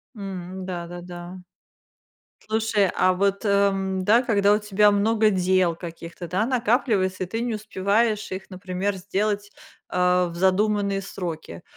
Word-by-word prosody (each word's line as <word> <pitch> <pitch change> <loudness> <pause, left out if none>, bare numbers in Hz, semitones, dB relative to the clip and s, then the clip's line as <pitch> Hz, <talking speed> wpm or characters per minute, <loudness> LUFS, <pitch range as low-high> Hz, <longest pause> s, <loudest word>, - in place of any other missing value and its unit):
М-да, 185 -2 -6
да, 175 0 -8
да. 175 +1 -9 1.1
Слушай, 220 -2 +1
а 185 0 +3
вот, 200 +3 0
э, - - +2
м, 195 -1 +1
да, 230 +5 +5
когда 205 -4 +3
у 210 - +4
тебя 210 0 +3
много 215 +1 +3
дел 185 -2 +2
каких-то, 170 0 -8
да, 190 +6 0
накапливается, 225 -6 +1
и - - -8
ты 225 +5 -3
не 235 -2 -1
успеваешь 215 +1 0
их, 190 +2 -6
например, 185 +1 -3
сделать, 205 +2 -2 0.4
а, 180 0 +2
в 170 - -9
задуманные 200 +2 +2
сроки. 165 - -6
195 Hz, 145 wpm, -24 LUFS, 180-210 Hz, 1.1 s, да